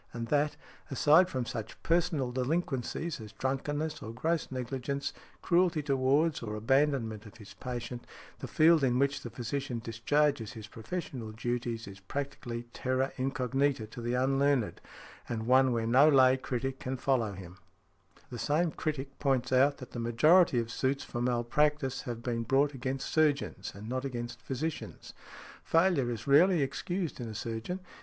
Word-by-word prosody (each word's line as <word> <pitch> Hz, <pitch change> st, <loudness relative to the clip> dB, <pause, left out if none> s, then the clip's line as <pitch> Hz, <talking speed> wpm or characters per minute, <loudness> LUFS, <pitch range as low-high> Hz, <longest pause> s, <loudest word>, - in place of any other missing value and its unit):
And 115 Hz, -1 st, -5 dB
that, 145 Hz, 0 st, +1 dB, 0.3 s
aside 155 Hz, +6 st, +5 dB
from 130 Hz, -5 st, -2 dB
such 110 Hz, -1 st, -6 dB
personal 165 Hz, -6 st, +1 dB
delinquencies 135 Hz, +2 st, -2 dB
as 105 Hz, -1 st, -10 dB
drunkenness, 145 Hz, +5 st, -2 dB
or 110 Hz, -, -6 dB
gross 160 Hz, +8 st, -1 dB
negligence, 135 Hz, +2 st, -3 dB, 0.3 s
cruelty 175 Hz, -3 st, +2 dB
towards, 140 Hz, +3 st, +2 dB
or 105 Hz, -2 st, -4 dB
abandonment 115 Hz, -2 st, +1 dB
of 110 Hz, +3 st, -14 dB
his 105 Hz, -3 st, -12 dB
patient, 120 Hz, -1 st, -6 dB, 0.3 s
the -, -, -6 dB
field 160 Hz, -1 st, +5 dB
in 125 Hz, -2 st, +3 dB
which 140 Hz, +1 st, +1 dB
the 120 Hz, -, -6 dB
physician 130 Hz, +2 st, -3 dB
discharges 120 Hz, +2 st, 0 dB
his 110 Hz, -2 st, -8 dB
professional 115 Hz, 0 st, -6 dB
duties 120 Hz, 0 st, -3 dB
is 100 Hz, -1 st, -10 dB
practically 120 Hz, +1 st, -5 dB
terra 130 Hz, +1 st, 0 dB
incognita 135 Hz, -1 st, 0 dB
to 110 Hz, +3 st, -9 dB
the 120 Hz, +1 st, -1 dB
unlearned, 135 Hz, -2 st, +1 dB, 0.5 s
and 110 Hz, -2 st, -3 dB
one 130 Hz, +1 st, +5 dB
where 115 Hz, -2 st, 0 dB
no 130 Hz, +6 st, +6 dB
lay 130 Hz, -3 st, +6 dB
critic 135 Hz, 0 st, -3 dB
can 130 Hz, +1 st, -3 dB
follow 120 Hz, -5 st, +1 dB
him". 95 Hz, -1 st, -10 dB, 0.7 s
The 120 Hz, -, -6 dB
same 160 Hz, +3 st, +1 dB
critic 140 Hz, -4 st, -4 dB
points 130 Hz, -3 st, +1 dB
out 135 Hz, +3 st, +4 dB
that 125 Hz, -, -10 dB
the 120 Hz, -, -6 dB
majority 130 Hz, +7 st, +4 dB
of 115 Hz, -1 st, -1 dB
suits 135 Hz, +3 st, -1 dB
for 120 Hz, -, -5 dB
malpractice 130 Hz, +3 st, +1 dB
have 120 Hz, -1 st, -5 dB
been 120 Hz, -2 st, -1 dB
brought 135 Hz, +5 st, +2 dB
against 130 Hz, +1 st, -4 dB
surgeons 150 Hz, -3 st, +1 dB
and 105 Hz, +2 st, -9 dB
not 130 Hz, +2 st, -2 dB
against 120 Hz, -3 st, -5 dB
physicians. 150 Hz, +4 st, -5 dB, 0.5 s
"Failure 165 Hz, -7 st, +3 dB
is 115 Hz, -2 st, -4 dB
rarely 155 Hz, +3 st, +5 dB
excused 175 Hz, +3 st, -3 dB
in 120 Hz, -, -4 dB
a 110 Hz, -, -7 dB
surgeon. 115 Hz, -, -4 dB
130 Hz, 155 wpm, -30 LUFS, 120-145 Hz, 0.7 s, no